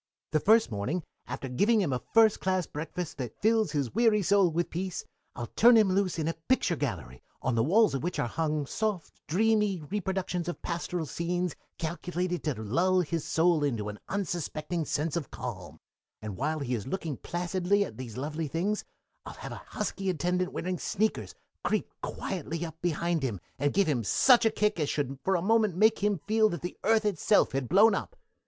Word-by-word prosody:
"The 155 Hz, -, +3 dB
first 220 Hz, -, +4 dB
morning, 125 Hz, -, -2 dB, 0.2 s
after 135 Hz, -, -5 dB
giving 205 Hz, -, +3 dB
him 165 Hz, -10 st, +1 dB
a 125 Hz, -, -2 dB
first 220 Hz, -2 st, +6 dB
class 185 Hz, -2 st, 0 dB
breakfast 155 Hz, +1 st, -6 dB
that 125 Hz, -4 st, -5 dB
fills 220 Hz, 0 st, +2 dB
his 140 Hz, -6 st, -1 dB
weary 220 Hz, -2 st, +3 dB
soul 195 Hz, 0 st, +4 dB
with 170 Hz, +2 st, -1 dB
peace, 185 Hz, +1 st, -4 dB, 0.3 s
I'd 120 Hz, -1 st, -7 dB
turn 240 Hz, +2 st, +7 dB
him 215 Hz, -3 st, +5 dB
loose 185 Hz, -2 st, +1 dB
in 160 Hz, -1 st, -1 dB
a 165 Hz, -, 0 dB, 0.2 s
picture 260 Hz, -9 st, +3 dB
gallery 95 Hz, -, -4 dB, 0.2 s
on 130 Hz, -, -1 dB
the 115 Hz, -, +2 dB
walls 205 Hz, -, +4 dB
of 135 Hz, -, -1 dB
which 175 Hz, +4 st, -2 dB
are -, -, 0 dB
hung 155 Hz, +2 st, -1 dB
soft, 210 Hz, +2 st, -2 dB
dreamy 210 Hz, +2 st, +2 dB
reproductions 180 Hz, +1 st, -3 dB
of 175 Hz, -, -4 dB
pastoral 170 Hz, 0 st, -2 dB
scenes 175 Hz, +2 st, -2 dB, 0.2 s
calculated 175 Hz, +2 st, -3 dB
to 150 Hz, -4 st, 0 dB
lull 180 Hz, -, +2 dB
his 165 Hz, -2 st, -2 dB
soul 165 Hz, -2 st, +2 dB
into 115 Hz, -7 st, -1 dB
an 105 Hz, -, -8 dB
unsuspecting 170 Hz, -4 st, -2 dB
sense 150 Hz, +2 st, -1 dB
of 170 Hz, -5 st, -3 dB
calm, 90 Hz, -, -7 dB, 0.4 s
and 105 Hz, -3 st, -6 dB
while 155 Hz, +7 st, -1 dB
he 130 Hz, -2 st, -2 dB
is 115 Hz, 0 st, -3 dB
looking 160 Hz, -2 st, -3 dB
placidly 180 Hz, +3 st, 0 dB
at -, -, -10 dB
these 125 Hz, -3 st, -7 dB
lovely 150 Hz, +4 st, -3 dB
things 185 Hz, +8 st, -1 dB, 0.4 s
I'd -, -, -8 dB
have -, -, -8 dB
a -, -, -8 dB
husky 195 Hz, -1 st, -3 dB
attendant 180 Hz, +2 st, 0 dB
wearing 180 Hz, 0 st, -3 dB
sneakers 215 Hz, +2 st, -1 dB, 0.3 s
creep -, -, -1 dB
quietly 170 Hz, -2 st, -4 dB
up 160 Hz, 0 st, -10 dB
behind 170 Hz, -1 st, 0 dB
him 115 Hz, -8 st, -2 dB, 0.2 s
and 145 Hz, +1 st, +2 dB
give 200 Hz, 0 st, +3 dB
him 130 Hz, -7 st, 0 dB
such 245 Hz, -, +5 dB
a -, -, +4 dB
kick 210 Hz, -3 st, 0 dB
as 150 Hz, -, 0 dB
should 140 Hz, -2 st, -2 dB
for 190 Hz, -, +2 dB
a 170 Hz, -, 0 dB
moment 215 Hz, -3 st, +3 dB
make 215 Hz, +4 st, +4 dB
him 205 Hz, 0 st, +1 dB
feel 215 Hz, +1 st, +3 dB
that 175 Hz, -, -5 dB
the 175 Hz, -, -4 dB
earth 220 Hz, 0 st, +3 dB
itself 205 Hz, +1 st, +3 dB
had 135 Hz, -2 st, -2 dB
blown 210 Hz, +4 st, +6 dB
up. -, -, -3 dB
175 Hz, 195 wpm, -29 LUFS, 145-200 Hz, 0.4 s, turn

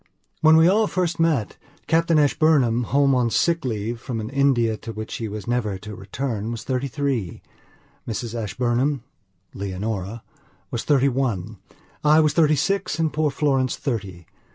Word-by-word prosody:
When 160 Hz, 0 st, +6 dB
we 160 Hz, +1 st, +6 dB
all 210 Hz, +3 st, +3 dB
first 175 Hz, -3 st, -1 dB
met, 155 Hz, -10 st, +1 dB, 0.3 s
Captain 165 Hz, 0 st, +2 dB
Ashburnham, 140 Hz, -5 st, +3 dB
home 140 Hz, +2 st, +3 dB
on 125 Hz, -2 st, +2 dB
sick 165 Hz, +7 st, +1 dB
leave 115 Hz, -1 st, -3 dB
from 120 Hz, -4 st, -4 dB
an 110 Hz, +2 st, -5 dB
India 135 Hz, -5 st, +2 dB
to 115 Hz, -, -8 dB
which 110 Hz, 0 st, -7 dB
he 115 Hz, -, -4 dB
was 105 Hz, 0 st, -6 dB
never 115 Hz, -5 st, -1 dB
to 105 Hz, +3 st, -9 dB
return, 110 Hz, +3 st, -4 dB
was 115 Hz, -1 st, -5 dB
thirty 130 Hz, +1 st, -2 dB
three; 130 Hz, -, -3 dB, 0.6 s
Mrs 115 Hz, 0 st, -4 dB
Ashburnham 120 Hz, +5 st, -1 dB, 0.5 s
Leonorawas 100 Hz, +4 st, -6 dB
thirty 140 Hz, -2 st, +3 dB
one. 110 Hz, -6 st, -2 dB, 0.4 s
I 150 Hz, +1 st, +5 dB
was 155 Hz, -2 st, +3 dB
thirty 155 Hz, -2 st, +4 dB
six 195 Hz, +1 st, -1 dB
and 160 Hz, -2 st, 0 dB
poor 155 Hz, 0 st, +1 dB
Florence 135 Hz, -3 st, 0 dB
thirty. 95 Hz, -, -4 dB
125 Hz, 155 wpm, -23 LUFS, 110-150 Hz, 0.6 s, When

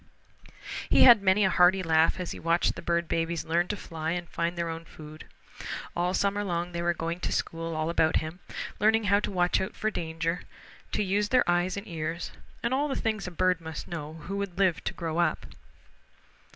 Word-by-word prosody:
He -, -, +6 dB
had 235 Hz, -5 st, +9 dB
many 195 Hz, +1 st, +4 dB
a 190 Hz, -, +2 dB
hearty 185 Hz, +1 st, +5 dB
laugh 160 Hz, +1 st, +3 dB
as 180 Hz, -, -4 dB
he -, -, -6 dB
watched 170 Hz, +1 st, +2 dB
the -, -, -8 dB
bird 170 Hz, 0 st, 0 dB
babies 165 Hz, 0 st, -1 dB
learn 170 Hz, +2 st, +1 dB
to 210 Hz, -, -3 dB
fly 160 Hz, -2 st, -4 dB
and 175 Hz, 0 st, -3 dB
to -, -, -26 dB
find 170 Hz, +1 st, -1 dB
their 170 Hz, 0 st, -1 dB
own 165 Hz, 0 st, -5 dB
food. 155 Hz, -1 st, -12 dB, 0.7 s
All 180 Hz, +2 st, 0 dB
summer 200 Hz, +1 st, +1 dB
long 175 Hz, -2 st, -2 dB
they 170 Hz, -1 st, -3 dB
were 175 Hz, 0 st, +1 dB
going 165 Hz, +2 st, -3 dB
to -, -, -2 dB
school 165 Hz, 0 st, -2 dB
all 155 Hz, 0 st, -1 dB
about 160 Hz, -1 st, +2 dB
him, 155 Hz, +3 st, -2 dB, 0.4 s
learning 220 Hz, +2 st, +4 dB
how 200 Hz, 0 st, +4 dB
to -, -, -3 dB
watch 180 Hz, -2 st, +2 dB
out 190 Hz, -, -4 dB
for 215 Hz, -, -1 dB
danger, 165 Hz, -1 st, -2 dB, 0.5 s
to -, -, +1 dB
use 205 Hz, +2 st, 0 dB
their 255 Hz, -1 st, +3 dB
eyes 175 Hz, +2 st, +1 dB
and 200 Hz, -, -6 dB
ears, 165 Hz, 0 st, -4 dB, 0.3 s
and 235 Hz, +2 st, 0 dB
all 285 Hz, +3 st, +1 dB
the 270 Hz, -, -2 dB
things 215 Hz, -4 st, -1 dB
a -, -, -5 dB
bird 180 Hz, 0 st, +1 dB
must 160 Hz, -1 st, -6 dB
know 155 Hz, -3 st, -6 dB
who 195 Hz, +6 st, -5 dB
would 200 Hz, -3 st, -4 dB
live 190 Hz, -4 st, +2 dB
to -, -, -1 dB
grow 165 Hz, -1 st, -3 dB
up. 170 Hz, -3 st, +1 dB
175 Hz, 215 wpm, -28 LUFS, 165-195 Hz, 0.7 s, had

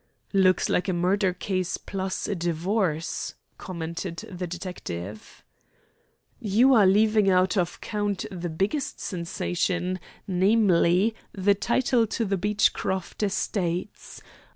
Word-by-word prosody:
"Looks 185 Hz, -2 st, +4 dB
like 180 Hz, -, 0 dB
a -, -, +1 dB
murder 185 Hz, +2 st, +2 dB
case 185 Hz, 0 st, -2 dB
plus 190 Hz, -1 st, -4 dB
a -, -, -1 dB
divorce," 175 Hz, -1 st, -1 dB, 0.2 s
commented 170 Hz, -1 st, -5 dB
the 180 Hz, -1 st, -4 dB
detective. 110 Hz, -, -7 dB, 1.0 s
"You 230 Hz, +6 st, +4 dB
are 210 Hz, -6 st, +6 dB
leaving 210 Hz, +1 st, +4 dB
out 185 Hz, +2 st, +3 dB
of 175 Hz, -3 st, -1 dB
count 205 Hz, -2 st, -2 dB
the 175 Hz, -2 st, -4 dB
biggest 195 Hz, -, -2 dB
sensation, 180 Hz, 0 st, -2 dB, 0.3 s
namely, 190 Hz, 0 st, +3 dB, 0.2 s
the 200 Hz, +1 st, +3 dB
title 235 Hz, +3 st, +1 dB
to 225 Hz, +2 st, -1 dB
the 195 Hz, -1 st, 0 dB
Beechcroft 195 Hz, -1 st, 0 dB
estates. 190 Hz, -2 st, -2 dB
190 Hz, 110 wpm, -26 LUFS, 175-205 Hz, 1.0 s, are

